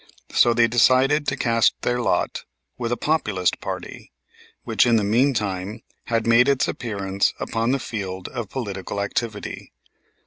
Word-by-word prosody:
So 120 -1 +4
they 115 0 +5
decided 130 +5 +3
to - - 0
cast 115 -2 +2
their 120 0 0
lot - - 0 0.3
with 120 -2 -3
the 120 - -1
Populist 105 - 0
party, - - -7 0.5
which - - +2
in 120 - +4
the 110 - +2
meantime 105 -4 0 0.2
had 115 -2 0
made 115 +3 +5
its 140 -2 +2
appearance 100 -4 -1
upon 115 +1 -1
the 135 - +2
field 95 -7 -5
of 120 -6 -5
political 100 -5 -5
activity. 105 +1 -4
115 Hz, 145 wpm, -23 LUFS, 100-125 Hz, 0.5 s, they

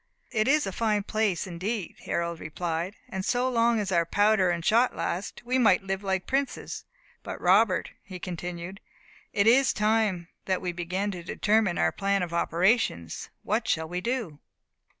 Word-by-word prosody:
"It 215 +1 +1
is 300 +2 +3
a 195 - -3
fine 210 0 0
place 215 -4 0
indeed," 190 +3 -4
Harold 170 -1 -2
replied; 170 +4 -3
"and 190 -1 -4
so 245 +5 +1
long 235 -2 +2
as 200 -2 -2
our 170 -2 +3
powder 205 +2 +3
and 170 -1 -2
shot 235 +3 +3
last, 185 +7 -3
we 255 +2 +1
might 225 -4 +4
live 195 0 -2
like 190 -2 -1
princes. 270 0 -2 0.4
But, - - -7
Robert," - - +3
he 185 -2 -9
continued, 180 +2 -6 0.5
"it 200 -2 +2
is 260 +3 +5
time 210 -5 +1 0.2
that 185 -1 0
we 180 -2 -3
begin 180 +4 -2
to 180 -2 -6
determine 210 +1 +1
our - - +2
plan 195 -1 0
of 170 -1 -5
operations. 170 - +1
What 220 +2 -1
shall 160 0 0
we 180 +2 -3
do?" 230 - -3
195 Hz, 170 wpm, -27 LUFS, 175-220 Hz, 0.5 s, is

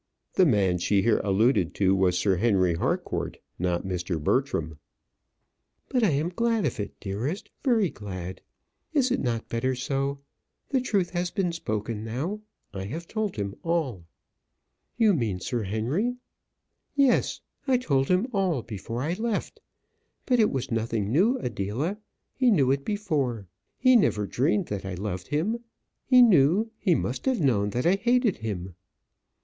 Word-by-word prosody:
The 185 -2 +5
man 95 -8 +2
she 95 +2 +2
here 115 -2 +3
alluded 100 -2 +2
was 95 -2 +3
Sir 95 -3 +2
Henry 95 -4 +3
Harcourt, 80 - -2 0.2
not 90 -1 0
Mr. 90 -2 -2
Bertram. 80 - 0 1.1
"But 250 -3 +1
I 210 - +5
am 150 +3 0
glad 230 +3 0
of 125 - -2
it, 105 - -5
dearest; 115 - -4
very 225 - +3
glad. 95 -2 -7 0.5
Is 265 -4 +2
it 260 - +1
not 120 -3 -2
better 130 +3 -1
so? 135 +2 -1 0.5
The 265 -2 +1
truth 200 -8 0
has 175 0 -1
been 185 -2 -1
spoken 110 -8 -3
now. 140 - -3 0.3
I 95 -1 -5
have 160 - -6
told 215 -3 -2
him 100 -2 -3
all." 150 - -1 0.9
"You 220 -3 +5
mean 110 - -1
Sir 120 +5 -2
Henry?" 120 - -1 0.8
"Yes, 275 -4 +2 0.3
I 260 -1 +4
told 140 - +1
him 185 +5 +2
all 185 - +1
before 115 +3 -5
I 160 +4 0
left. 220 +2 -3 0.6
But 250 -2 +2
it 215 - +5
was 130 -3 -3
nothing 115 -2 -1
new, 205 - +3
Adela. 125 - -3 0.3
He 255 -2 +3
knew 140 - +4
it 140 0 0
before. 145 - -1 0.3
He 255 0 +5
never 105 - +3
dreamed 160 - +1
that 100 -2 -3
I 95 -1 -4
loved 90 -1 -4
him. 190 +11 0 0.5
He 250 -1 +8
knew, 195 - +4
he 180 -5 +3
must 130 - -3
have 260 -4 +2
known 110 - +2
that 120 +5 -2
I 180 +3 +4
hated 240 0 +2
him." 95 -5 -5
135 Hz, 155 wpm, -26 LUFS, -, 1.1 s, He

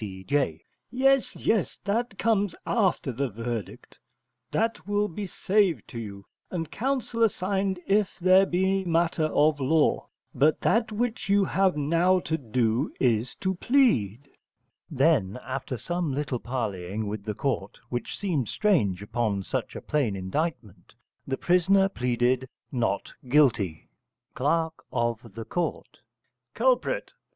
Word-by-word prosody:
C.J._ 95 - -2 0.3
Yes, 270 +1 +2
yes, 220 -5 0
that 215 0 -1
comes 205 -5 +1
after 190 - +1
verdict: 115 -4 -5 0.5
that 225 -1 -1
will 205 0 +1
be 200 +2 -5
saved 190 - +1
to 115 - -6
you, 100 -3 -8 0.2
and 165 -4 -4
counsel 250 -1 -2
assigned 195 -3 +1
if 200 0 +1
there 185 +1 +5
be 190 +2 +1
matter 165 -2 +1
of 150 -1 +2
law: 145 +3 +2 0.3
but 155 +2 +3
that 225 +3 +2
which 225 -1 -2
you 200 0 +4
have 190 -4 +2
now 170 +5 +3
to 160 - -1
do 120 -1 0
is 120 -1 +1
to 190 0 -1
plead. 145 - +2 0.6
Then 130 - +2
after 130 -1 -4
some 175 +2 -2
little 135 -2 -2
parleying 110 -5 -3
with 105 0 -4
the 105 -2 -3
court 105 -7 -2
(which 120 -2 -4
seemed 160 - -1
strange 105 - +1
upon 105 -2 -1
such - - -3
a - - -5
plain 135 -9 0
indictment) 105 - -4 0.3
the 135 - -1
prisoner 190 +2 +3
pleaded 125 -4 0 0.2
Not 115 -6 -1 0.2
Guilty. 110 - +2 0.5
Cl. 160 +4 +1 0.2
of 120 -2 0 0.3
Ct. 175 -1 -3 0.6
Culprit. - - +1
150 Hz, 125 wpm, -27 LUFS, 120-195 Hz, 0.6 s, there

